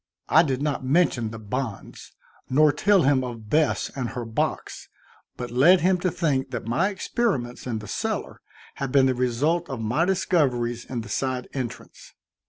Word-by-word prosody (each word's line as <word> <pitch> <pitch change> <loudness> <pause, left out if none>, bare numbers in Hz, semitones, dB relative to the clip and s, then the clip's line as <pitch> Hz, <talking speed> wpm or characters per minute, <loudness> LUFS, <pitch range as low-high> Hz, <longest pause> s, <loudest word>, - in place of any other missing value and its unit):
I 160 - +7
did 135 -4 -1
not 145 -3 -1
mention 130 -5 +2
the 115 - -8
bonds, 110 0 -6 0.4
nor 150 +3 +5
tell 200 +2 +3
him 135 -1 +3
of 115 -4 -7
Bess 155 -1 +1
and 130 -4 -3
her 125 -1 -5
box, 110 0 -3 0.5
but 125 -1 -5
led 165 +10 +5
him 185 +1 +3
to 180 - 0
think 145 -6 -1
that 120 -4 -5
my 135 - +1
experiments 190 - -2
in 115 -3 -2
the 105 -1 -8
cellar - - -3 0.4
had 135 -2 -3
been 135 -1 +5
the 130 - +2
result 135 +8 0
of 135 -3 -4
my 120 +10 +1
discoveries 130 -11 0
in 120 -3 -4
the 110 - -10
side 130 +2 -2
entrance. 130 -4 -7
130 Hz, 175 wpm, -25 LUFS, 120-160 Hz, 0.5 s, I